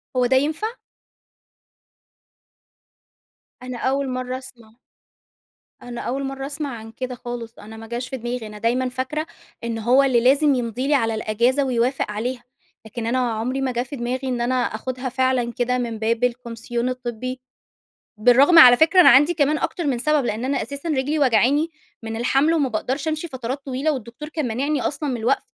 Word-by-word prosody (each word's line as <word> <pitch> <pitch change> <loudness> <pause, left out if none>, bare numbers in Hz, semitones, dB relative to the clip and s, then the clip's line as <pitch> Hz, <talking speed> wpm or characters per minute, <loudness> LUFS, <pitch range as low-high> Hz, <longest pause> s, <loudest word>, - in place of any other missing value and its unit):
هو 250 -1 +3
ده 260 +2 +2
ينفع؟ 310 +9 0 3.0
أنا 255 -1 -6
أول 270 +2 -1
مرّة 255 0 -3
أسمع 240 -4 -13 1.1
أنا 240 -1 -7
أول 270 +3 -3
مرّة 270 0 -4
أسمع 290 +1 -4
عن 225 0 -10
كده 255 +2 -5
خالص، 240 -1 -7
أنا 220 +2 -11
ما 225 0 -10
جاش 240 +2 -4
في 265 - -4
دماغي. 240 -1 -4
أنا 210 - -10
دايمًا 245 +4 0
فاكرة 260 +5 -3 0.4
إن 230 -1 -3
هو 250 +5 +4
اللي 260 -3 +3
لازم 275 +3 +4
يمضي 245 +2 -2
لي 295 - +2
على 225 -4 +1
الأجازة 235 +6 +1
ويوافق 250 -2 0
عليها. 240 +4 -4 0.4
لكن 225 +1 -6
أنا 250 +3 +1
عمري 250 +5 -2
ما 265 - 0
جه 240 0 -1
في 260 +3 -8
دماغي 255 +1 -3
إن 245 -2 -1
أنا 250 +2 0
آخُدها 255 +2 -2
فعلًا 255 -2 0
كده 250 +1 0
من 230 -3 -3
باب 230 +2 0
الكومسيون 240 0 -2
الطبّي. 255 0 -5 0.8
بالرغم 260 +9 +6
على 250 -6 +10
فكرة 330 +6 +5
أنا - - +8
عندي 290 +7 +5
كمان 300 -1 +2
أكتر 345 - -3
من 255 -4 0
سبب، 300 +1 +1
لإن 225 +1 -2
أنا 275 +1 0
أساسًا 280 +7 -6
رجلي 295 +1 0
واجعاني 275 +5 +3 0.3
من 225 0 -5
الحَمل 275 +7 +2
وما 285 -5 +1
باقدرش 260 +7 -2
أمشي 315 +2 -3
فترات 260 0 -5
طويلة 275 +4 0
والدكتور 255 +3 -7
كان 310 -5 -3
مانعني 275 +5 -1
أصلًا 295 +1 -2
من 255 - -1
الوَقْف 235 +4 +1
255 Hz, 175 wpm, -22 LUFS, 235-275 Hz, 3.0 s, على